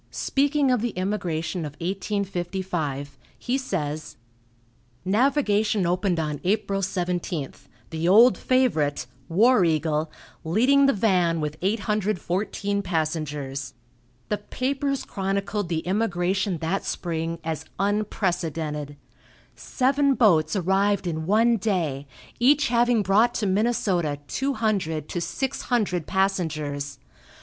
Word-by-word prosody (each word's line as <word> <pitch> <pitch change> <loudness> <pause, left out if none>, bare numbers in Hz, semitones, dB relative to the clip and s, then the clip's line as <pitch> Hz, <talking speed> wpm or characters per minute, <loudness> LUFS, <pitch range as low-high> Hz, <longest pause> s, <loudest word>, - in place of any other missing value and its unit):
Speaking 285 0 +1
of 250 -4 +2
the 235 -5 -3
immigration 180 -3 -2
of 150 -2 -6
1855, 175 - -3 0.2
he 245 - -2
says: 155 - -3 0.9
"Navigation 215 -3 +2
opened 180 0 +1
on 150 -2 -3
April 195 +1 0
17th, 175 -5 -3 0.2
the 160 +1 -1
old 225 +7 +7
favorite, 160 - +1 0.2
'War 215 +5 +5
Eagle,' 155 -1 0 0.3
leading 255 +12 +4
the 275 - +4
van 180 -6 +2
with 150 -1 -3
814 205 -1 -1
passengers. 150 -6 -3 0.5
The 210 - -1
papers 275 +5 -2
chronicled 195 0 -2
the 165 -2 -1
immigration 190 -1 0
that 165 +5 -2
spring 165 -1 -3
as 160 -2 -4
unprecedented. 170 -8 -2 0.6
Seven 275 +1 +1
boats 160 -9 +3
arrived 195 +2 +1
in 160 -2 -3
one 225 +4 +4
day, 165 -10 -1 0.3
each 275 +4 +4
having 240 -2 +3
brought 205 +5 +3
to 215 - -1
Minnesota 190 -7 +1
two 275 +2 -1
hundred 190 -9 -1
to 175 - -3
six 265 +9 -3
hundred 195 -9 0
passengers. 155 -7 -1
190 Hz, 110 wpm, -25 LUFS, 160-215 Hz, 0.9 s, old